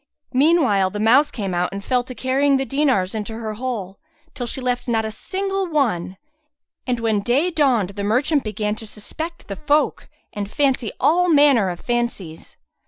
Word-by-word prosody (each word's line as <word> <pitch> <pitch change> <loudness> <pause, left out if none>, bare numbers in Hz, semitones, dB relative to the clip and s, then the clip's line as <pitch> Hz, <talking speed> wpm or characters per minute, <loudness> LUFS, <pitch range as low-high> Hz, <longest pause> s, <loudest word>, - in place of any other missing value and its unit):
Meanwhile 260 - +3
the 205 - -6
mouse 250 +7 +5
came 200 -6 -4
out 175 +1 0
and 200 0 -7
fell 250 -1 +1
to 255 - -9
carrying 270 +4 +2
the 270 - -1
dinars 265 -10 +1
into 220 0 -4
her 220 -2 -4
hole, 215 -5 -5 0.3
till 245 - -4
she 265 - -3
left 250 -1 -2
not 225 -2 +1
a 220 - -3
single 390 - -3
one; 215 - 0 0.7
and 245 -2 0
when 220 -3 +1
day 270 - +1
dawned 255 - +2
the 200 0 -5
merchant 260 +7 +1
began 210 -1 -2
to 220 - -9
suspect 320 +12 -7
the 195 - -6
folk 300 0 0 0.2
and 200 -1 -4
fancy 265 -5 +1
all 360 +3 +3
manner 285 - +5
of 175 -1 -5
fancies. 235 -9 -3
240 Hz, 175 wpm, -21 LUFS, 210-285 Hz, 0.7 s, mouse